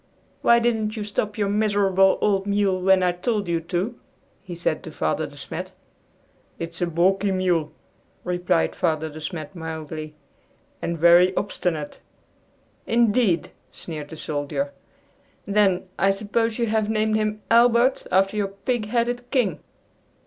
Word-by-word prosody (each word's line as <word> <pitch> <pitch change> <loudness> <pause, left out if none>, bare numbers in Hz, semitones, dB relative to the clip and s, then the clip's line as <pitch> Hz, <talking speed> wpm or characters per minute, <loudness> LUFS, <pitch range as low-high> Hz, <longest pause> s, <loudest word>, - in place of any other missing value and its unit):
"Why 235 - +5
didn't 225 -2 0
you 215 - -2
stop 210 +1 -3
your 205 -2 +1
miserable 200 -2 +3
old 195 -1 +1
mule 200 -2 +1
when 190 0 +4
I 180 - +3
told 200 +3 -2
you 170 -1 0
to?" 180 +7 -3 0.4
he 185 -2 -8
said 165 -2 -1
to 160 - -9
Father 80 - -1
De - - -14
Smet. - - -6 0.8
"It's 165 +1 -6
a 175 - +2
balky 190 +4 +2
mule," 180 -5 0 0.5
replied 175 - 0
Father 160 -2 -1
De 155 +1 -10
Smet 160 +1 -6
mildly, 160 -2 -6 0.7
"and 170 - -2
very 175 +3 +5
obstinate." 165 -6 -2 0.9
"Indeed!" 230 -5 +2 0.2
sneered 155 -3 -7
the - - -8
soldier; 150 - -3 0.7
"then, 200 -3 +2
I 195 - +4
suppose 215 +3 0
you 235 - +1
have 215 -1 0
named 215 0 +1
him 215 0 -1
Albert 235 +2 +4
after 195 +2 +3
your 205 -1 0
pig 210 +3 -3
headed 245 +2 -1
King!" 225 - +1
195 Hz, 140 wpm, -23 LUFS, 170-215 Hz, 0.9 s, Why